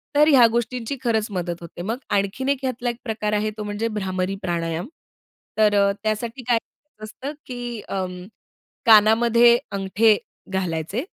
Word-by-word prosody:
तर 300 +1 +6
ह्या 265 -6 +7
गोष्टींची 235 +2 -2
खरंच 220 -3 +1
मदत 175 -2 -2
होते. 170 0 -9
मग 225 +6 -2
आणखीन 200 +7 0
एक 280 - +2
ह्यातला 250 -2 -2
एक 240 - -3
प्रकार 215 -3 -2
आहे, 210 +1 +1
तो 210 - -4
म्हणजे 210 +2 -2
भ्रामरी 190 -1 -2
प्राणायाम. 170 0 -2 0.7
तर 210 -1 +4
अ, 200 0 +4
त्यासाठी 225 +4 -2
काय 240 -2 +4
करायचं 230 0 -13
असतं, 260 +7 -6
की 240 -3 -6
अं, 180 -2 -4 0.6
कानामध्ये 235 +2 +6
अंगठे 200 +2 +3 0.4
घालायचे 185 - -2
215 Hz, 150 wpm, -23 LUFS, 195-240 Hz, 0.7 s, ह्या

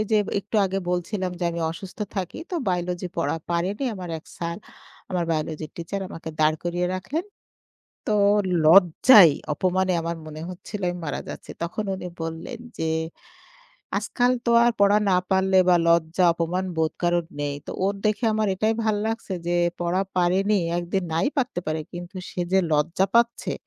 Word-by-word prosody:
যে 215 - +5 0.2
একটু 215 +2 -4
আগে 195 +1 -2
বলছিলাম 180 +1 -2
যে - - 0
আমি 170 0 -4
অসুস্থ 185 +5 -9 0.2
থাকি 185 -2 -3
তো 365 - -3
বায়োলজি 180 0 -1
পড়া 165 - 0
পারিনি, 185 +9 -1
আমার 180 -2 -7
এক - - -19
স্যার 170 0 -3 0.5
আমার 180 -2 0
বায়োলজির 155 -1 -2
টিচার 170 +4 -4
আমাকে 165 -1 -7
দাঁড় 155 0 +4
করিয়ে 175 +1 0
রাখলেন। 290 - -3 0.8
তো - - +1 0.5
লজ্জায় 180 - +8 0.2
অপমানে 185 +3 +1
আমার 165 0 -3
মনে 155 0 -8
হচ্ছিল 195 +3 -7
আমি 175 - -4
মারা 145 - -3
যাচ্ছি। - - -8
তখন 195 +5 -3
উনি 180 - -6
বললেন 165 +10 -5 0.2
যে, 160 - -1 1.1
"আজকাল 245 0 +1
তো - - +3
আর 240 - +5
পড়া 200 +1 +5
না 180 - +4
পারলে 190 0 +3
বা 175 - +6
লজ্জা 170 +2 +3
অপমান 175 +3 -1
বোধ 160 -1 +1
কারোর 175 -1 +1
নেই। 145 -1 -1
তো - - -5
ওর 200 +1 +1
দেখে 215 +3 0
আমার 215 -1 +1
এটাই 215 +4 +1
ভাল 215 -1 +2
লাগছে 225 -3 -3 0.2
যে 175 - +1 0.3
পড়া 175 +2 +1
পারেনি, 190 +4 +3 0.2
একদিন 175 +2 -2
নাই 165 - +2
পারতে 250 -10 0
পারে 155 0 -1
কিন্তু 175 +2 -8
সে 180 - -4
যে 190 - +5
লজ্জা 165 +6 +2
পাচ্ছে, 235 0 +2
180 Hz, 165 wpm, -24 LUFS, 170-200 Hz, 1.1 s, লজ্জায়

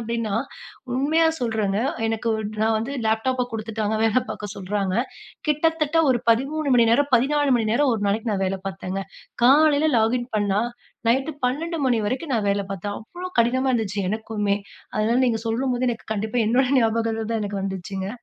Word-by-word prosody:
அப்படீன்னா, 230 -2 -2 0.6
உண்மையா 310 +5 +3
சொல்றேங்க. 215 -4 0 0.3
எனக்கு 225 +1 -2
ஒரு 220 - -3 0.2
நா 220 - +3
வந்து 245 +6 -4
லேப்டாப்ப 245 +3 +1
குடுத்துட்டாங்க. 220 -1 -2
வேல 225 +3 +3
பார்க்க 205 -1 -6
சொல்றாங்க. 195 0 -2 0.5
கிட்டத்தட்ட 320 +1 +1
ஒரு 240 -2 +2
13 275 +4 +1
மணிநேரம், 235 +5 +4
14 280 +3 +3
மணி 220 - -1
நேரம் 270 0 +3
ஒரு 215 - -3
நாளைக்கு 220 +2 -1
நா - - 0
வேல 190 +1 -1
பார்த்தேங்க. 190 0 -4 0.4
காலையில 295 +3 +5
லாகின் 240 +2 +1
பண்ணா 205 0 +1 0.5
நைட்டு 270 +6 +2 0.2
12:00 280 -3 0
வரைக்கும் 270 +5 -2
நா - - +2
வேல 200 0 0
பார்த்தேன். 205 +2 -4
அவ்வளோ 355 +11 -8
கடினமா 260 +3 +1
இருந்துச்சு 210 -4 -1
எனக்குமே. 215 -2 -1 0.4
அதனால 220 +3 +2
நீங்க 225 -2 +1
சொல்லும்போது, 250 +2 0
எனக்கு 230 - -6
கண்டிப்பா 220 +4 -2
என்னோட 255 +3 +3
ஞாபகங்கள் 225 0 0
தான் 225 - 0
எனக்கு 200 -1 -3
வந்துச்சுங்க. 190 0 -4
230 Hz, 155 wpm, -23 LUFS, 210-265 Hz, 0.6 s, காலையில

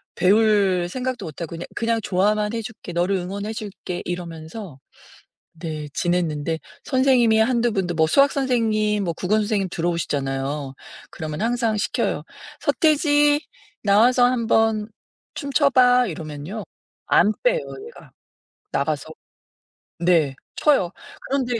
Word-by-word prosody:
배울 195 -2 +3
생각도 255 +3 -3
못 155 -1 -9
하고 165 - -4
"그냥 170 +1 -6
그냥 230 0 0
좋아만 210 +3 +1
해 230 - -2
줄게. 210 -5 -8
너를 175 +3 +1
응원해 200 +4 -4
줄게." 200 -4 -6
이러면서 170 -1 -7 0.8
네 155 -2 -5
지냈는데 165 -3 -1 0.2
선생님이 255 -4 +3
1-2 235 +1 +2
분도 180 -4 -1
뭐 160 0 +4
수학 275 - +4
선생님 220 -6 +1
뭐 170 - -1
국어 185 +5 0
선생님 210 -2 0
들어오시잖아요. 145 -5 -2 0.4
그러면 155 +1 -5
항상 230 -1 +1
시켜요. 205 - -1 0.4
"서태지, 295 -2 +3 0.4
나와서 230 +5 +4
1 245 -2 +1
번 220 -1 +2 0.5
춤 280 0 -5
춰 280 +1 +4
봐." 250 -1 +5
이러면요 160 +4 -6 0.4
안 210 - +4
빼요 - - +3 0.3
얘가. 470 - -14 0.6
나가서 - - -1 0.9
네 170 -5 +2 0.2
춰요. 270 - +3 0.4
그런데 260 -3 0
210 Hz, 265 characters per minute, -22 LUFS, 175-245 Hz, 0.9 s, 봐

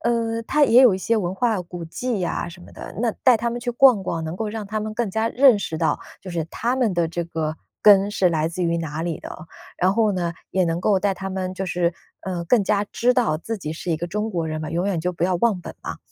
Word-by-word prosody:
呃， 230 -1 0
它 295 +6 +1
也 250 -2 +7
有 240 -7 +6
一 185 - -3
些 230 +4 +1
文 185 -3 -1
化 225 -4 +1
古 175 0 -8
迹 235 +5 -3
呀 175 -1 -2
什 175 +1 -13
么 - - -14
的。 - - -9
那 235 -1 +2
带 255 -2 +7
他 235 +2 0
们 235 - -3
去 245 0 -3
逛 240 -4 +5
逛， 165 -3 -3
能 160 +3 -5
够 220 - -2
让 215 -1 -5
他 215 +2 -3
们 215 0 -4
更 225 -2 -2
加 220 +3 0
认 260 -4 +6
识 160 -5 -4
到， 160 - +1 0.2
就 190 - -8
是 170 -2 -2
他 240 +3 -1
们 245 -6 +1
的 170 -2 +1
这 170 +1 -3
个 160 -2 -3 0.2
根 200 -1 +6
是 195 -3 +2
来 160 -2 0
自 175 +2 -3
于 170 0 +1
哪 160 -1 -4
里 165 -2 -3
的。 - - -9 0.5
然 185 +2 +2
后 220 -2 +3
呢， 175 -2 -2 0.2
也 190 -1 +2
能 165 0 -1
够 195 -2 +3
带 200 -1 +1
他 195 +1 -5
们 185 -1 -3
就 190 - -3
是， 175 -2 0 0.3
呃， 180 -3 -4
更 220 +4 +3
加 205 +1 +1
知 250 +1 +2
道 230 -12 +1
自 225 +7 -4
己 155 -6 -5
是 170 +2 -5
一 160 - +1
个 170 - -4
中 210 +5 -2
国 170 -5 -2
人 155 0 -3
嘛， 155 - -4
永 170 +4 -1
远 185 -5 0
就 180 +2 -1
不 170 - -1
要 185 0 +1
忘 215 0 +2
本 - - -8
嘛。 - - -6
190 Hz, 295 characters per minute, -23 LUFS, 170-225 Hz, 0.5 s, 也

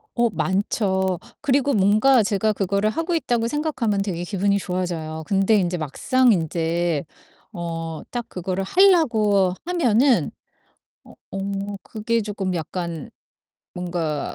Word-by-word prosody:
어 235 -1 +2
많죠. 190 -2 0 0.2
그리고 280 -1 +2
뭔가 215 +5 +4
제가 210 +1 +1
그거를 200 +2 0
하고 330 +8 -2
있다고 240 -7 0
생각하면 240 -8 -1
되게 175 -3 -3
기분이 200 +2 +1
좋아져요. 170 -4 -3
근데 195 +2 +3
인제 180 -2 +1
막상 245 - +2
인제 165 -1 0 0.5
어 165 -3 -5
딱 240 -1 -4
그거를 185 +1 -3
하려고 220 - +4
하면은 270 -7 +2 0.7
어 - - -16 0.2
어 200 +1 -3
그게 230 +1 -1
조금 195 -3 -3
약간 170 -1 -4 0.6
뭔가 170 -4 -3
200 Hz, 250 characters per minute, -22 LUFS, 175-230 Hz, 0.7 s, 뭔가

